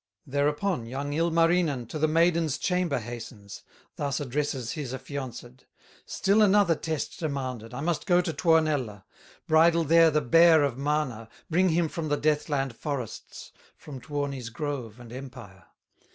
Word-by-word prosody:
Thereupon 145 0 -1
young 140 +4 -4
Ilmarinen 165 -4 +2
To 155 - -5
the 155 - +3
maiden's 165 -2 +2
chamber 180 -4 0
hastens, 115 -3 -8 0.4
Thus 140 -2 -2
addresses 135 -3 -2
his 135 -5 -5
affianced: 130 -2 -8 0.4
"Still 200 +3 +2
another 200 -4 +5
test 160 0 -4
demanded, 130 - -4
I 125 - -6
must 170 +1 -2
go 175 -1 +4
to 175 -2 -1
Tuonela, 150 - +1 0.4
Bridle 165 +1 +4
there 165 +1 +5
the 155 0 +2
bear 165 +3 +6
of 140 -4 0
Mana, 135 -5 -2 0.2
Bring 185 +3 +3
him 165 0 +2
from 160 0 -5
the 145 - +1
Death 150 0 0
land 135 -4 -1
forests, 135 -5 -6 0.3
From 135 -4 -10
Tuoni's 140 -4 -4
grove 125 -4 -5
and 120 -1 -11
empire!" 100 -9 -10
145 Hz, 145 wpm, -27 LUFS, 125-165 Hz, 0.4 s, bear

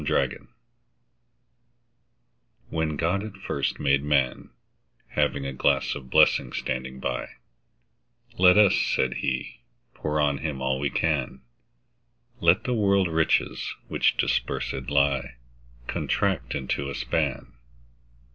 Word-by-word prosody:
The - - -6
Pulley - - 0 2.2
WHEN 80 -2 -1
God 90 +6 0
at 105 -3 -8
first 70 -7 -2
made 70 -1 +2
Man, 70 -4 0 0.6
Having 70 -1 0
a 70 - -3
glass 70 +1 +1
of 65 - -9
blessings 60 - +3
standing 65 0 -4
by—Let - - -2
us 105 -2 +6
(said 65 - 0
He) 65 -2 -3 0.3
pour 75 0 -2
on 70 -1 +1
him 75 -4 -3
all 65 0 -1
we 70 0 0
can; 65 - -1 1.0
Let 85 +5 +4
the 125 - -1
world's 100 -5 +2
riches, 80 0 0
which - - +2
dispersèd 65 -1 -1
lie, 70 -3 +1 0.5
Contract - - -1
into 70 +1 -2
a 70 - -5
span. - - -2
70 Hz, 115 wpm, -26 LUFS, 65-80 Hz, 2.2 s, us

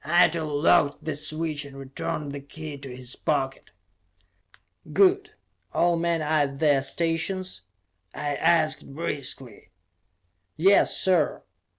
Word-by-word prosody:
Eitel 165 0 +3 0.2
locked 155 -5 +3
the 155 - -1
switch 155 0 -2
and 140 -1 -11
returned 135 +2 -4
the 140 - -5
key 150 +2 -8
to 135 -1 -9
his 125 0 -5
pocket. 135 -3 -2 1.2
"Good. 395 +2 +3 0.4
All 175 0 +3
men 170 -1 0
are 155 0 +2
at 135 - -10
their 145 -2 +3
stations?" 165 - -2 0.5
I 145 -1 -3
asked 160 -4 +1
briskly. 135 -7 -4 0.9
"Yes, 195 +4 +4
sir! 180 -5 +2
155 Hz, 115 wpm, -25 LUFS, 140-170 Hz, 1.2 s, Yes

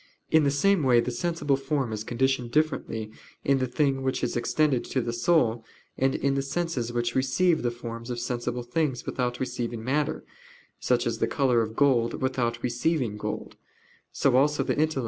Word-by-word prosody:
In 160 -2 +5
the - - +4
same 190 +6 +3
way 125 -4 +4
the 125 - -1
sensible 150 +1 0
form 135 -3 -2
is 105 0 -4
conditioned 125 +1 0
differently 120 -7 -1 0.3
in 140 -1 +2
the 130 - 0
thing 135 +1 +1
which 130 -1 -1
is 125 - -1
external 135 +3 +2
to 130 - -2
the 120 -1 -2
soul, 120 -3 +2 0.3
and 135 0 +1
in 140 - +1
the 135 - 0
senses 135 -4 -2
which 120 0 -1
receive 135 +7 +2
the 120 - +1
forms 115 0 -7
of 120 -1 -3
sensible 120 0 -3
things 130 +1 -1
without 125 -1 -2
receiving 120 -3 -3
matter, 145 +4 -1 0.6
such - - +1
as - - -2
the - - +2
color 130 -4 +2
of 110 0 -4
gold 120 -4 +2
without 120 -3 -1
receiving 120 -1 0
gold. 105 - -5
130 Hz, 165 wpm, -27 LUFS, 120-140 Hz, 0.6 s, In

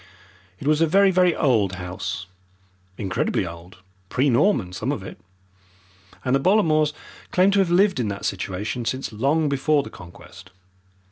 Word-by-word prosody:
It - - -9
was 155 +1 +2
a 165 - +4
very, 195 +4 +4
very 180 -2 +3
old 110 - +2
house, 90 +1 -5 0.7
incredibly 95 -1 -1
old 85 +1 -10 0.3
pre 135 +2 +1
Norman, 120 - +2
some 95 - -2
of - - -4
it - - -10 1.1
and 125 - +1
the - - +2
Bollamores 155 -4 +3 0.4
claimed 185 +2 +3
to 200 - +3
have 190 -3 +2
lived 185 -1 +3
in 120 - 0
that 100 -1 -5
situation 100 +5 -3
since 130 +1 -3
long 140 +8 +1
before 140 +1 +1
the - - -10
Conquest. 90 +2 -13
135 Hz, 155 wpm, -23 LUFS, -, 1.1 s, a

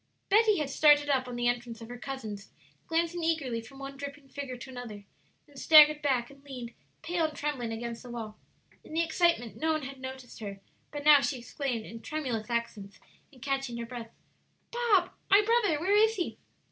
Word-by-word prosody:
'" - - -47
Betty 430 0 +5
had 295 -3 -2
started 290 -1 +5
up 260 -2 +1
on 245 - -6
the 240 0 0
entrance 240 -2 -2
of 225 - -9
her 245 +1 -8
cousins, 220 -7 -6 0.4
glancing 335 +1 0
eagerly 280 -8 0
from 245 +4 -14
one 275 0 -8
dripping 280 0 -8
figure 275 -3 -6
to 245 - -10
another, 225 -5 -8 0.4
then 290 - -22
staggered 300 +1 +7
back 260 -4 0
and 275 0 -18
leaned, 250 -4 -8 0.3
pale 340 0 0
and 310 -1 -4
trembling, 270 -6 -2
against 230 +1 -5
the 250 - -11
wall. 225 -3 -6 0.5
In - - -12
the 335 - +3
excitement 335 -8 +1
no 320 0 +1
one 310 -2 -2
had 270 0 -7
noticed 260 -1 -8
her, 200 -3 -6 0.3
but 290 -1 -5
now 295 -2 +8
she 275 -1 -1
exclaimed, 245 -2 -4
in 230 0 -9
tremulous 255 -9 -3
accents, 225 -4 -3 0.3
and 255 -4 -15
catching 270 -3 -2
her 235 - -4
breath, 235 -1 -7 0.6
"Bob 445 -7 +2 0.2
my 405 +2 +7
brother; 445 -9 +3
where 380 +6 +2
is 440 +1 +5
he?" 355 - -3
275 Hz, 195 wpm, -29 LUFS, 240-310 Hz, 0.6 s, now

